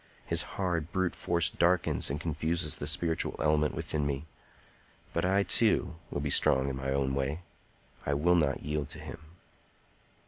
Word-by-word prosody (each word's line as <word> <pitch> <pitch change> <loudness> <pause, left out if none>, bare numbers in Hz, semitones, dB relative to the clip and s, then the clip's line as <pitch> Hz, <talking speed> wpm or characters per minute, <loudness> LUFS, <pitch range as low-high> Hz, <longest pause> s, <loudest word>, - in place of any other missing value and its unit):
His - - +3 0.2
hard, 85 -4 -1
brute 95 -1 0
force 85 -1 +1
darkens 85 0 +2
and 70 +2 -3
confuses 80 0 0
the 70 - -5
spiritual 80 +1 0
element 75 -1 +1
within 75 -1 -2
me; 70 +1 -2 0.9
but 85 - 0
I, 95 +2 +3
too, 110 -3 +2 0.2
will 70 - -3
be 70 -1 -2
strong 65 0 +4
in 65 - -3
my 65 0 -3
own 70 -1 0
way. 70 +5 -2 0.6
I 70 - 0
will 85 +5 +3
not 75 -6 +1
yield 75 -1 -2
to - - -8
him." - - -8
75 Hz, 165 wpm, -30 LUFS, 70-85 Hz, 0.9 s, strong